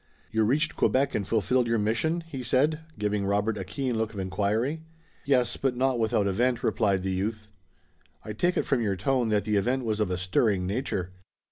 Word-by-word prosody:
"You 110 0 +2
reached 150 +7 +1
Quebec 135 +1 +2
and 100 - -2
fulfilled 115 +3 +1
your 115 0 +2
mission?" 120 +11 0
he 165 -6 -7
said, 135 +6 +2 0.2
giving 105 -1 -1
Robert 105 +2 0
a 100 - -4
keen 125 +6 -3
look 110 -1 -2
of - - -5
inquiry. 105 +10 -1 0.4
"Yes, 125 -3 +2
but 135 -2 0
not 130 -1 +1
without 110 -2 +1
event," 120 +5 +1
replied 100 -5 +1
the 95 - -1
youth. 105 +3 -3 0.8
"I 105 - -5
take 175 - +1
it - - +1
from 135 -4 +1
your 100 -3 0
tone 120 +5 0
that 105 -1 +2
the 105 0 +1
event 125 +5 0
was 110 -1 -1
of 105 -3 +1
a 90 - -1
stirring 95 +1 +1
nature." 95 -3 -2
110 Hz, 200 wpm, -27 LUFS, 100-130 Hz, 0.8 s, You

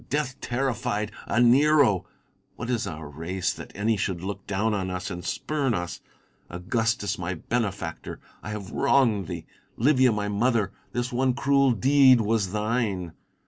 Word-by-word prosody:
Death 145 -3 -2
terrified, 120 -4 -1 0.2
a 120 - +1
Nero! 130 - +4 0.5
What 115 - -4
is 120 -2 -1
our 80 -2 -6
race, 80 +5 -3
that - - -10
any 110 +2 +1
should 95 -3 -2
look 100 +1 -5
down 105 +3 0
on 95 -2 -2
us 90 +2 -4
and 90 0 -6
spurn 140 -6 -1
us 85 -1 -4 0.5
1 85 - -7
Augustus, 110 -2 0
my 90 +1 -3
benefactor, 100 -4 -3 0.2
I - - -7
have 105 -3 -6
wronged 120 -9 +2
thee! 85 -2 -6 0.3
Livia, 130 0 +4
my 105 -1 -1
mother, 105 -1 +1 0.2
this 120 +1 -2
one 130 0 +1
cruel 140 0 +3
deed 130 +2 +5
was 110 -3 0
thine 105 -5 -1
110 Hz, 155 wpm, -26 LUFS, 95-125 Hz, 0.5 s, deed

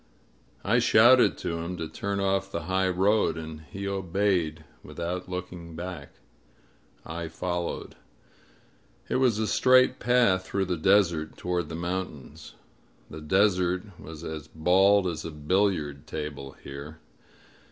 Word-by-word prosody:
I 110 +5 +3
shouted 120 +2 +6
to 85 0 -3
him 85 +2 -5
to 80 -1 -4
turn 100 +4 -3
off 95 0 0
the 85 - -3
high 95 +2 +1
road, 95 0 +2
and 80 -1 -7
he 100 +6 -5
obeyed, 95 -4 -1 0.2
without 90 +2 -5
looking 90 -2 -7
back. 90 +2 -7 0.9
I 85 +1 -5
followed. 85 +1 -4 1.2
It - - +1
was 125 -5 +3
a 110 - 0
straight 130 +4 +4
path 120 -7 +3
through 95 0 -1
the 90 -1 -1
desert 85 -3 +2
toward 90 0 -2
the - - -5
mountains. 85 -5 -5 0.6
The 80 - -8
desert 90 +1 +2 0.2
was 80 +1 -10
as 80 -2 -6
bald 95 +5 +3
as 80 -3 -3
a - - -5
billiard 75 -2 -1
table 70 -3 -6
here. 70 +3 -9
90 Hz, 130 wpm, -27 LUFS, 80-100 Hz, 1.2 s, shouted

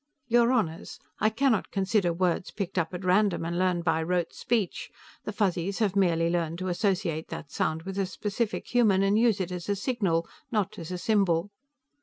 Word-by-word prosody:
"Your 240 0 +4
Honors, 175 -10 -1 0.2
I 215 - +3
cannot 230 -1 +1
consider 195 -2 +1
words 175 +1 0
picked 190 -2 -3
up 165 - -1
at 180 +1 -6
random 190 -1 +2
and 170 +1 -2
learned 180 -2 +1
by 165 -1 +1
rote 175 +1 -1
speech. 225 -7 -1 0.4
The - - -3
Fuzzies 195 -2 0
have 205 -4 +1
merely 170 -4 +3
learned 170 -1 -1
to 185 +1 -3
associate 180 -4 -1
that 145 - -8
sound 160 +1 -1
with 195 +2 -5
a 195 - 0
specific 210 +4 -3
human, 210 -6 +4
and 195 +1 +3
use 225 -2 +3
it 185 -1 -2
as 180 +1 -5
a 200 - +2
signal, 195 -7 0 0.2
not 210 -2 -1
as 165 - -7
a 180 - -3
symbol." 195 -2 +1
190 Hz, 190 wpm, -27 LUFS, 170-210 Hz, 0.4 s, Your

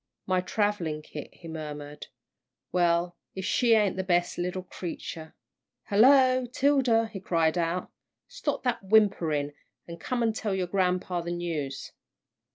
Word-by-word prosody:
"My 185 -1 +1
travelling 180 -6 -1
kit," 150 -1 -8
he 170 - -13
murmured; 150 -2 -7 0.6
"well, 175 0 +1 0.2
if 190 -1 -4
she 235 +1 +4
ain't 205 -4 +2
the 190 - -1
best 175 -2 +1
little 180 +1 -2
creature!" 165 -3 -7 0.5
"Hello, 255 +3 +5
'Tilda!" 255 -3 +3
he 195 - -5
called 165 -3 +1
out; 175 +1 -1 0.4
"stop - - -3
that 250 -2 0
whimpering, 175 -8 +2 0.3
and 170 0 -9
come 245 -2 -1
and 225 -1 +1
tell 205 -3 -2
grampa 180 -1 0
the 170 - -5
news." 165 -6 -4
180 Hz, 135 wpm, -28 LUFS, 165-215 Hz, 0.6 s, Hello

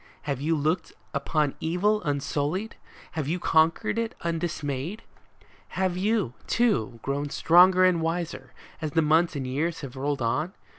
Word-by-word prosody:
Have 140 -4 -3
you 160 +3 +1
looked 160 +3 -1 0.2
upon 145 0 0
evil 205 +6 +1
unsullied? 145 +7 -2 0.4
have 155 -4 -3
you 165 +4 0
conquered 175 +7 +2
it 230 -1 -2
undismayed? 165 - -3 0.7
Have 185 -1 +1
you, 205 - 0
too, 130 - +1
grown 140 +1 -2
stronger 185 +4 +6
and 180 -3 +3
wiser, 165 +1 -3 0.3
as 155 -2 -3
the 165 - +3
months 160 +2 +3
and 135 -2 -3
the 130 - -4
years 160 +5 -1
have 140 -3 -8
rolled 140 0 -2
on 150 +10 -1
160 Hz, 150 wpm, -26 LUFS, 145-180 Hz, 0.7 s, stronger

